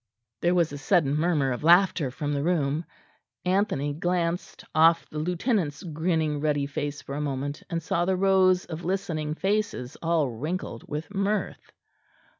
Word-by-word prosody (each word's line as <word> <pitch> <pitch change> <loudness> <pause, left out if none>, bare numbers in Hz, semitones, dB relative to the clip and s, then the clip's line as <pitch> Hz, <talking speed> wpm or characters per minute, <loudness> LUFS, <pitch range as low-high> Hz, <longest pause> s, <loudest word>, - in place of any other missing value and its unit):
There 175 +1 +3
was 170 -4 +2
a 145 - -6
sudden 145 -3 +2
murmur 150 -4 +1
of 125 - -4
laughter 175 -3 +5
from 145 +3 -3
the 140 - 0
room; 155 -1 0 0.6
Anthony 180 -7 +1
glanced 175 +3 -2
off 165 +1 +5
the 150 - -4
lieutenant's 175 - -1
grinning 160 -2 0
ruddy 145 -2 +1
face 145 0 -4
for 140 - -7
a 145 - -2
moment, 145 0 -3
and 165 -2 -2
saw 175 0 0
the 190 0 +1
rows 185 -1 +4
of 165 0 -7
listening 160 -5 -2
faces 195 -10 -1
all 165 -3 +2
wrinkled 130 +1 -4
with 155 +7 -5
mirth. 200 +1 -2
165 Hz, 155 wpm, -26 LUFS, 145-180 Hz, 0.6 s, laughter